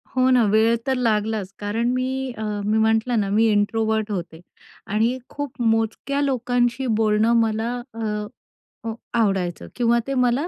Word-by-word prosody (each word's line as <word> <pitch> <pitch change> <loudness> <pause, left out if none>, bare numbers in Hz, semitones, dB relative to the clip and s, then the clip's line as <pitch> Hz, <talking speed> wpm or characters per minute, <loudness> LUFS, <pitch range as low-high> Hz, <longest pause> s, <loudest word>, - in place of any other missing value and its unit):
हो, 255 0 +3
ना. 250 -2 +5
वेळ 220 +2 +4
तर 265 - +2
लागलाच. 215 -4 0
कारण 220 +4 -1
मी, 255 0 0 0.3
अ, 220 - -4 0.2
मी 215 +1 +2
म्हटलं 220 +2 +2
ना, 200 -2 -1
मी 220 +3 +3
इंट्रोव्हर्ट 220 +1 0
होते. 170 -4 -5 0.5
आणि 225 +5 +1
खूप 285 -4 -6
मोजक्या 225 +5 0
लोकांशी 245 -1 0
बोलणं 215 +1 +3
मला 225 +1 0 0.2
अ, 215 +1 -5 0.7
आवडायचं 195 -6 0
किंवा 235 -1 +2
ते 275 - -1
मला 250 +4 +1
225 Hz, 145 wpm, -22 LUFS, 215-245 Hz, 0.7 s, ना